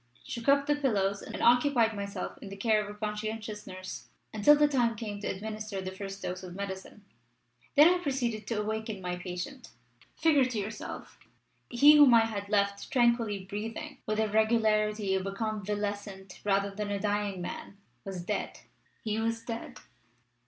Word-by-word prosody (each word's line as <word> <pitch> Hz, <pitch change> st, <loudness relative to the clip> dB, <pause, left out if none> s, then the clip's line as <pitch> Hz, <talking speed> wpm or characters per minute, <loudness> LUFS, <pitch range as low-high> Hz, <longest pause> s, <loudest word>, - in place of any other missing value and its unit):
"shook 235 Hz, +3 st, -3 dB
up 280 Hz, 0 st, +5 dB
the 295 Hz, -, +2 dB
pillows, 200 Hz, -8 st, 0 dB
and -, -, -6 dB
occupied 240 Hz, -2 st, +4 dB
myself 200 Hz, 0 st, -4 dB
in 200 Hz, -, -8 dB
the 195 Hz, -, -7 dB
cares 210 Hz, 0 st, +1 dB
of 205 Hz, -, -8 dB
a -, -, -19 dB
conscientious 215 Hz, 0 st, -4 dB
nurse 185 Hz, 0 st, -8 dB, 0.3 s
until 220 Hz, +8 st, +6 dB
the 295 Hz, 0 st, +4 dB
time 245 Hz, -5 st, +1 dB
came 210 Hz, -2 st, -5 dB
to 205 Hz, -, -4 dB
administer 215 Hz, 0 st, -4 dB
the 185 Hz, 0 st, -4 dB
first 195 Hz, +1 st, -7 dB
dose 180 Hz, +1 st, -4 dB
of 180 Hz, -1 st, -9 dB
medicine. 200 Hz, +1 st, -7 dB, 0.7 s
Then 295 Hz, +3 st, +9 dB
I 360 Hz, +1 st, +4 dB
proceeded 245 Hz, -, -2 dB
to 225 Hz, -3 st, -1 dB
awaken 220 Hz, 0 st, -3 dB
my 180 Hz, -1 st, -3 dB
patient. 180 Hz, +9 st, -6 dB, 0.5 s
Figure 295 Hz, -5 st, +4 dB
to 250 Hz, -3 st, -3 dB
yourself! 210 Hz, +1 st, -6 dB, 0.5 s
He 290 Hz, +5 st, +7 dB
whom 280 Hz, -5 st, +8 dB
I 225 Hz, -1 st, +6 dB
had 205 Hz, -3 st, -5 dB
left 200 Hz, -1 st, +1 dB
tranquilly 235 Hz, -6 st, +2 dB
breathing, 225 Hz, +8 st, -6 dB
with 215 Hz, 0 st, 0 dB
the 220 Hz, 0 st, +2 dB
regularity 215 Hz, -2 st, +2 dB
of 190 Hz, 0 st, 0 dB
a -, -, -2 dB
convalescent 205 Hz, -2 st, -4 dB
rather 200 Hz, 0 st, +1 dB
than 205 Hz, +1 st, -4 dB
a 200 Hz, -1 st, -1 dB
dying 205 Hz, -2 st, -1 dB
man, 180 Hz, +2 st, -6 dB, 0.3 s
was 190 Hz, -3 st, -5 dB
dead! -, -, -3 dB, 0.4 s
He 215 Hz, 0 st, -1 dB
was 225 Hz, 0 st, -1 dB
dead!" 230 Hz, -1 st, -6 dB
215 Hz, 170 wpm, -30 LUFS, 200-230 Hz, 0.7 s, Then